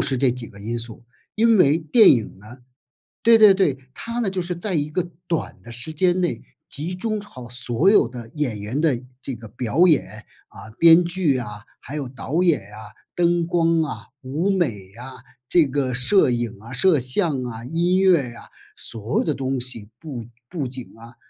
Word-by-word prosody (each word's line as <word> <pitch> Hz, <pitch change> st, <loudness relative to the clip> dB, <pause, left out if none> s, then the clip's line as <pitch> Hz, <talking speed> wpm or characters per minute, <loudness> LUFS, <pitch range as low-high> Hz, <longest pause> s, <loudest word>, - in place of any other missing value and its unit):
是 130 Hz, -2 st, +1 dB
这 130 Hz, -2 st, +3 dB
几 125 Hz, -2 st, -7 dB
个 100 Hz, -, -15 dB
因 115 Hz, +3 st, -4 dB
素， 115 Hz, 0 st, -7 dB, 0.3 s
因 225 Hz, 0 st, +4 dB
为 150 Hz, -2 st, +4 dB
电 165 Hz, +8 st, +5 dB
影 110 Hz, -5 st, 0 dB
呢 110 Hz, +5 st, -13 dB, 0.7 s
对 230 Hz, 0 st, +6 dB
对 205 Hz, -3 st, +8 dB
对， 145 Hz, -9 st, +1 dB, 0.2 s
它 230 Hz, +1 st, -5 dB
呢， 220 Hz, -5 st, 0 dB
就 190 Hz, -1 st, -3 dB
是 180 Hz, 0 st, -2 dB
在 185 Hz, +2 st, -3 dB
一 150 Hz, 0 st, -1 dB
个 175 Hz, +1 st, -2 dB, 0.2 s
短 165 Hz, -2 st, -3 dB
的 120 Hz, -, -11 dB
时 125 Hz, +7 st, -3 dB
间 180 Hz, +3 st, +1 dB
内 175 Hz, -, -2 dB, 0.3 s
集 160 Hz, +6 st, -2 dB
中 215 Hz, +3 st, -3 dB
好 125 Hz, -, -11 dB
所 125 Hz, +7 st, +1 dB
有 205 Hz, -, +5 dB
的 120 Hz, -2 st, -9 dB
演 125 Hz, -9 st, -2 dB
员 110 Hz, +8 st, -3 dB
的 140 Hz, -7 st, +1 dB, 0.2 s
这 135 Hz, +1 st, -6 dB
个 115 Hz, -, -11 dB
表 125 Hz, -, +1 dB
演， 155 Hz, -5 st, 0 dB, 0.2 s
啊， 110 Hz, -, -12 dB
编 170 Hz, +1 st, +7 dB
剧 170 Hz, -6 st, 0 dB
啊， 105 Hz, -3 st, -8 dB, 0.2 s
还 145 Hz, -, -8 dB
有 140 Hz, -4 st, -3 dB
导 140 Hz, +7 st, -2 dB
演 170 Hz, -9 st, +3 dB
啊、 105 Hz, +2 st, -12 dB, 0.2 s
灯 170 Hz, -1 st, +1 dB
光 165 Hz, -1 st, +2 dB
啊、 150 Hz, -4 st, -5 dB, 0.2 s
舞 155 Hz, +10 st, -1 dB
美 175 Hz, -6 st, +2 dB, 0.3 s
啊、 130 Hz, 0 st, -10 dB, 0.3 s
这 170 Hz, -4 st, +5 dB
个 135 Hz, -1 st, -1 dB
摄 130 Hz, +6 st, +4 dB
影 120 Hz, -2 st, -2 dB
啊、 115 Hz, +3 st, -12 dB
摄 155 Hz, +4 st, +3 dB
像 130 Hz, +2 st, 0 dB
啊、 115 Hz, 0 st, -7 dB
音 175 Hz, +6 st, +1 dB
乐 185 Hz, -3 st, +5 dB, 0.2 s
啊， -, -, -12 dB, 0.3 s
所 110 Hz, +1 st, -3 dB
有 -, -, +1 dB
的 155 Hz, -, +1 dB
东 135 Hz, -1 st, -2 dB
西， 115 Hz, -4 st, -2 dB
布 130 Hz, -8 st, -7 dB, 0.2 s
布 150 Hz, -5 st, -4 dB
景 130 Hz, 0 st, -7 dB
啊， 115 Hz, +2 st, -14 dB
140 Hz, 210 characters per minute, -22 LUFS, 120-175 Hz, 0.7 s, 对